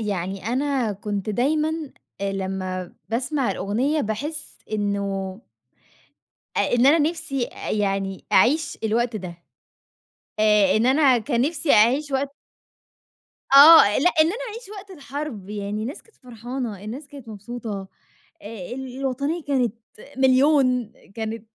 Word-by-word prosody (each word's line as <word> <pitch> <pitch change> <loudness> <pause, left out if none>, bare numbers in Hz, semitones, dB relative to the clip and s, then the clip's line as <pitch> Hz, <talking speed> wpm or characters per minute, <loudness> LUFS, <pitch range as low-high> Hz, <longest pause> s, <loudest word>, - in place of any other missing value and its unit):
يعني 195 -1 -3
أنا 260 -2 0
كنت 205 +1 -4
دايمًا 300 +8 +1 0.5
آآ 200 0 -1
لمّا 185 -1 -4 0.2
باسمع 255 +1 -1
الأغنية، 235 +11 -1
باحِس 290 +7 -5
إنه 200 -1 -2 1.2
آآ - - +3
إن 245 +2 +4
أنا 305 +4 +6
نِفْسي 310 -4 -1
أ - - -6
يعني 195 -2 -1
أعيش 290 +10 +3
الوقت 230 +1 0
ده. 185 -3 -6 1.1
آآ 210 -2 +4
إن 230 +3 +2
أنا 265 -2 +4
كان 235 +1 -1
نِفْسي 295 +1 +1
أعيش 260 +8 +4
وقت 275 +1 -1 1.2
آه، 280 -8 +9
لأ، 355 +6 +4
إن 310 - +6
أنا 435 +9 -3
أعيش 455 0 -9
وقت 395 0 -11
الحرب، 280 - -7
يعني 210 0 -4
الناس 260 +8 -6
كانت 450 - -27
فرحانة، 240 -4 -6
الناس 255 +8 -7
كانت 275 -5 -12
مبسوطة، 215 -2 -7 0.5
آآ 205 -4 -8
ال 260 -1 -7
الوطنية 280 +5 -2
كانت 255 -6 0 0.4
مليون، 260 -3 +3 0.2
كانت 220 0 -5
240 Hz, 130 wpm, -23 LUFS, 205-280 Hz, 1.2 s, آه